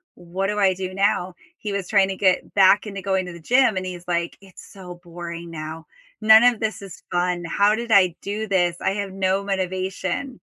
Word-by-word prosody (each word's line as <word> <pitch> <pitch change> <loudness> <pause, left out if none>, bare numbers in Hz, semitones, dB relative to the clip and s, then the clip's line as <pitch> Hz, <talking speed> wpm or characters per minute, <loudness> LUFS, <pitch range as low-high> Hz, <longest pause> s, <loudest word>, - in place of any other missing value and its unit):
"What 180 +3 -4
do 210 +1 -2
I 190 -2 +4
do 185 0 -5
now?" 185 -2 0 0.2
He 210 - -5
was 200 -2 -3
trying 195 -2 +3
to 190 - -3
get 185 -2 +1
back 195 +1 +5
into 200 -1 -6
going 190 -1 -1
to 180 - -8
the 170 - -11
gym 245 +1 +3
and 185 - -3
he's 180 -1 -8
like, 170 -1 -2
"It's 195 -1 -15
so 180 -2 -10
boring 170 0 -8
now. 160 0 -7 0.3
None 220 +1 +8
of 245 -3 +4
this 220 -2 -3
is 195 -4 -11
fun, 175 0 0
how 205 +5 +2
did 235 +1 -5
I 185 -5 +5
do 210 +2 -4
this? 175 -3 +1
I - - +1
have 200 -1 -4
no 190 +1 0
motivation." 190 +5 -3
190 Hz, 210 wpm, -22 LUFS, 180-200 Hz, 0.3 s, None